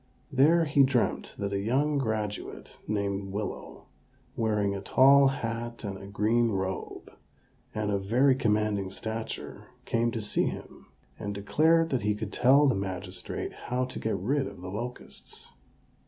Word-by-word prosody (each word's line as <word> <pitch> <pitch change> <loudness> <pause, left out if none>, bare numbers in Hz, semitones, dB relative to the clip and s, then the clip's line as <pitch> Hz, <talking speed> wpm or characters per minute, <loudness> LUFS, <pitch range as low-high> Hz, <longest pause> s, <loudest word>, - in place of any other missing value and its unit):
There 155 +5 +5
he 145 -1 +3
dreamt 130 -3 +1
that 100 0 -3
a 100 - 0
young 140 +8 +1
graduate, 110 -4 -4
named 100 -2 -2
Willow, 105 +1 -5 0.5
wearing 105 -3 +1
a 100 - -4
tall 135 +6 +6
hat 120 -3 -3
and 100 -2 -4
a 95 - -9
green 110 +4 +2
robe, 95 -2 -4 0.6
and 105 -1 -1
of 100 -1 -1
very 125 +7 +4
commanding 105 -5 0
stature, 110 +3 -6 0.2
came 115 +1 +1
to 115 - -3
see 105 -1 +1
him, - - -8 0.3
and 100 0 -4
declared 160 +11 +3
that 130 - +1
he 105 +1 +1
could 105 -1 -5
tell 135 +4 +5
the 135 - +4
magistrate 95 -2 -4
how 125 +1 -2
to 125 - -6
get 110 -3 -1
rid 135 +9 0
of 100 -3 -10
the 95 0 -6
locusts. 120 +5 -7
110 Hz, 155 wpm, -28 LUFS, 100-130 Hz, 0.6 s, tall